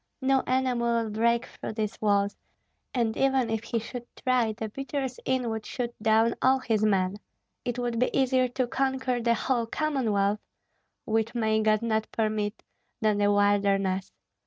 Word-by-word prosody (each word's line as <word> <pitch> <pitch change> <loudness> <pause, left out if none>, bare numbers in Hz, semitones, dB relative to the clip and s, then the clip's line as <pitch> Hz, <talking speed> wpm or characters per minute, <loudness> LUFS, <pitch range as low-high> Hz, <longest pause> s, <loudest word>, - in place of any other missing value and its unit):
No 265 0 +3
enemy 255 -1 +1
will 235 -2 0
break 235 +2 +2
through - - -7
these 215 -1 -3
walls, 200 -1 +2 0.6
and 230 -3 0
even 265 -4 +2
if 225 0 -2
he 230 - -1
should 240 +2 -6
try 250 -3 +1
the 220 0 -5
beaters 270 +2 -4
in 260 -2 0
would 220 -1 -3
shoot 240 +1 -4
down 225 +1 +4
all 260 +1 +5
his 225 -5 0
men. 195 -2 +2 0.5
It 245 -1 -2
would 240 -2 -1
be 250 - +3
easier 260 -1 +3
to 250 +1 -1
conquer 260 -1 -1
the 235 0 +2
whole 235 -1 0
Commonwealth 220 -9 0 0.7
which 225 +1 0
may 220 -2 +2
God 215 0 +2
not 220 -1 0
permit! 215 -1 -1 0.4
than 215 -3 +2
the 205 0 +3
wilderness. 200 -2 +2
230 Hz, 160 wpm, -27 LUFS, 215-250 Hz, 0.7 s, all